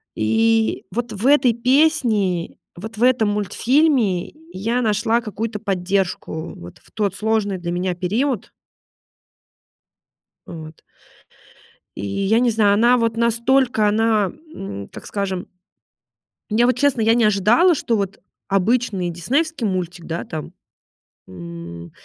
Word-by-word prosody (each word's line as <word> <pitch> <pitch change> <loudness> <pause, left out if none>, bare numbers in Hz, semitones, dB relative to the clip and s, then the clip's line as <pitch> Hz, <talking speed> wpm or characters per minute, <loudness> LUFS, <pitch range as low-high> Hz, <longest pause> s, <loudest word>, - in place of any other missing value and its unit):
И 225 - +1
вот 240 0 -3
в 210 +6 -2
этой 275 -5 +5
песне, 235 - +1 0.2
вот 215 +4 -8
в 235 - 0
этом 250 -4 +3
мультфильме, 215 - +1 0.2
я 230 - -1
нашла 225 +1 +1
какую-то 215 0 -4
поддержку 185 -4 -2
вот 85 +1 -12
в - - -24
тот 200 -3 -1
сложный 215 -3 0
для 175 -1 -4
меня 180 +1 -1
период. 220 +7 -1 2.0
Вот. 155 -1 -10 1.1
И 100 - -5
я 195 - +1
не 245 -1 +3
знаю, 215 -2 +3
она 235 +4 +4
вот 230 -1 0
настолько, 235 0 +2
она, 215 -2 +2 0.2
м, 100 0 -7
так - - -11
скажем 195 -3 -3 1.0
Я, 225 +3 +3
вот 250 - +1
честно, 285 -5 +2
я 225 +1 +4
не 240 - +3
ожидала, 215 - +4
что 235 - -1
вот 195 -1 -3 0.3
обычный 195 -1 +1
диснеевский 260 - -1
мультик, 180 -3 -3
да 165 +1 -4
там, 155 -2 -7 0.7
м, 85 -1 -9
215 Hz, 125 wpm, -20 LUFS, 180-235 Hz, 2.0 s, этой